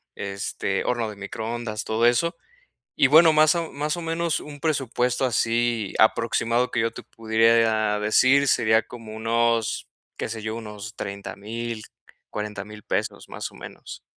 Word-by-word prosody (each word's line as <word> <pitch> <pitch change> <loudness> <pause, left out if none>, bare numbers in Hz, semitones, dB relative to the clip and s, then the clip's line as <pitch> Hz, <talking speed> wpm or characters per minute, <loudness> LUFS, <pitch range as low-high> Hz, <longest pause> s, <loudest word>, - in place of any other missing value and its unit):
este, 100 0 -2
horno 120 -3 -1
de 105 - -8
microondas, 110 +2 -5
todo 110 +2 +1
eso. 165 +9 +3 0.6
Y, - - +5
bueno, 160 +3 +7
más 155 +1 +5
o 170 -1 -2
más 150 +3 -2
o 170 - -5
menos, 165 0 -1
un 145 -1 -10
presupuesto 130 -4 0
así 115 -3 0
aproximado 115 +2 +2
que - - +1
yo 115 0 +1
te - - -10
pudiera 110 -1 +2
decir 130 +6 +4
sería 110 -1 +4
como 115 -2 -10
unos, 115 0 0 0.3
qué - - -3
sé 110 -1 -5
yo, 110 +1 -4
unos 105 -1 -8
30000, 110 +3 -5 0.5
$40000 105 0 -6
pesos, - - -3
más - - -6
o - - -19
menos. - - -10
115 Hz, 150 wpm, -24 LUFS, 110-125 Hz, 0.6 s, bueno